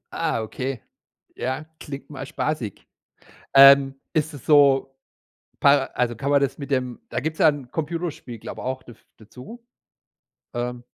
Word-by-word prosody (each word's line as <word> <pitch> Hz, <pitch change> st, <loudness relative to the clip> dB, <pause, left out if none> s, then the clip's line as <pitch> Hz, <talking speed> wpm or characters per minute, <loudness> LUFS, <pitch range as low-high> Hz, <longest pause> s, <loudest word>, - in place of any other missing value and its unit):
Ah, 155 Hz, -8 st, -1 dB
okay, 130 Hz, +2 st, -4 dB, 0.6 s
ja, 130 Hz, +5 st, -3 dB
klingt 140 Hz, -1 st, -8 dB
mal 135 Hz, -2 st, -7 dB
spaßig. 135 Hz, -7 st, -4 dB, 0.7 s
Ähm, 135 Hz, 0 st, +8 dB, 0.2 s
ist 155 Hz, 0 st, 0 dB
es 140 Hz, -, -11 dB
so, 140 Hz, -3 st, +4 dB, 0.7 s
pa 140 Hz, -1 st, +5 dB
also, 120 Hz, -2 st, -1 dB
kann 140 Hz, +1 st, -3 dB
man 140 Hz, -1 st, +4 dB
das 135 Hz, 0 st, -1 dB
mit 140 Hz, -2 st, -7 dB
dem 125 Hz, -2 st, -1 dB
da -, -, -2 dB
gibt 160 Hz, +1 st, -3 dB
es -, -, -19 dB
ja 160 Hz, -, +6 dB
'n 145 Hz, -4 st, -1 dB
Computerspiel, 160 Hz, -6 st, -4 dB
glaube -, -, -8 dB
ich, 130 Hz, 0 st, -4 dB
daf 120 Hz, -3 st, -15 dB
dazu. 130 Hz, -, -13 dB, 0.9 s
Ähm 120 Hz, 0 st, -4 dB
135 Hz, 155 wpm, -23 LUFS, 125-150 Hz, 0.9 s, Ähm